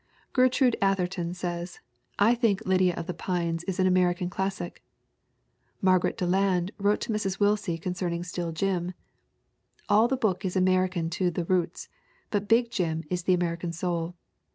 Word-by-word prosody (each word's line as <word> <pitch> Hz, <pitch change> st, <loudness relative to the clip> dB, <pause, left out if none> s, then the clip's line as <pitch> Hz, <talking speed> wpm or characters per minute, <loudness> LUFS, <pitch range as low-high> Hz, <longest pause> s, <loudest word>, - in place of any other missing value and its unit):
Gertrude 255 Hz, -1 st, +4 dB
Atherton 180 Hz, -3 st, 0 dB
says: 175 Hz, -1 st, -4 dB, 0.4 s
"I 215 Hz, +4 st, +5 dB
think 230 Hz, -5 st, +1 dB
Lydia 185 Hz, -1 st, +3 dB
of 170 Hz, -, -4 dB
the 180 Hz, -, -4 dB
Pines 170 Hz, -2 st, -2 dB
is 190 Hz, -2 st, -3 dB
an 185 Hz, -, +4 dB
American 180 Hz, -1 st, +2 dB
classic." 190 Hz, -2 st, -3 dB, 1.0 s
Margaret 185 Hz, +1 st, +2 dB
Deland 185 Hz, -1 st, +1 dB
wrote 205 Hz, +1 st, +2 dB
to -, -, -3 dB
Mrs. 195 Hz, -2 st, -2 dB
Willsie 205 Hz, -4 st, +1 dB
concerning 175 Hz, 0 st, -3 dB
Still 170 Hz, -1 st, -4 dB
Jim: 180 Hz, +1 st, -1 dB, 1.0 s
"All 215 Hz, +3 st, +5 dB
the 265 Hz, +1 st, 0 dB
book 200 Hz, -6 st, 0 dB
is 185 Hz, -1 st, -2 dB
American 185 Hz, -2 st, +2 dB
to 180 Hz, +1 st, +1 dB
the 175 Hz, 0 st, -3 dB
roots 180 Hz, -1 st, -1 dB, 0.4 s
but 205 Hz, -1 st, -1 dB
big 235 Hz, +1 st, +3 dB
Jim 165 Hz, -6 st, -1 dB
is 180 Hz, -1 st, -2 dB
the 185 Hz, -, +4 dB
American 170 Hz, -1 st, -2 dB
soul. 170 Hz, 0 st, -2 dB
185 Hz, 155 wpm, -27 LUFS, 175-195 Hz, 1.0 s, I